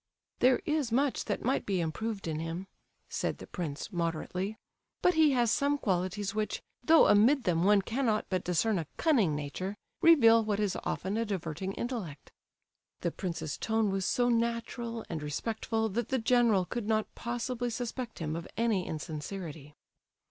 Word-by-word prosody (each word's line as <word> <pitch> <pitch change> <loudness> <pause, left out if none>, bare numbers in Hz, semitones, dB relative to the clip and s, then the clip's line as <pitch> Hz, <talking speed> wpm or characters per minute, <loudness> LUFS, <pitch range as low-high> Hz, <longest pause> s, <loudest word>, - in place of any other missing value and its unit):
"There 255 +5 +4
is 300 -7 0
much 270 +3 +1
that - - -3
might 265 +3 +1
be 195 -3 -1
improved 195 +5 -3
in 155 -1 -2
him," 165 +3 -4 0.4
said - - -2
the - - -9
prince, 165 +3 -5
moderately, 175 +4 -2 0.5
"but 360 - +5
he 315 -3 +5
has 240 -3 +3
some 285 +3 +2
qualities 190 -2 -1
which—though 215 +8 +2
amid 240 +7 +5
them 170 -2 +1
one 200 0 +5
cannot 225 -1 0
but 185 -2 -1
discern 180 +3 +1
a 160 - -4
cunning 230 - +3
nature—reveal 225 - +3
what 210 -1 -1
is 205 -3 0
often 195 +4 -2
a 230 - +1
diverting 190 -2 -3
intellect." 210 - -5 0.7
The 170 - 0
prince's 160 -5 -4
tone 220 -2 +1
was 195 0 -1
so 245 -1 +2
natural 230 0 -1
and 165 -3 -4
respectful 220 +8 -2
that 225 +3 -2
the 265 - +1
general 230 -5 +3
could 235 +2 -4
not 220 -1 0
possibly 240 +1 -3
suspect 240 +1 -4
him 155 -1 -3
of 165 0 -5
any 220 -5 +1
insincerity. 155 -1 -6
210 Hz, 155 wpm, -30 LUFS, 175-235 Hz, 0.7 s, but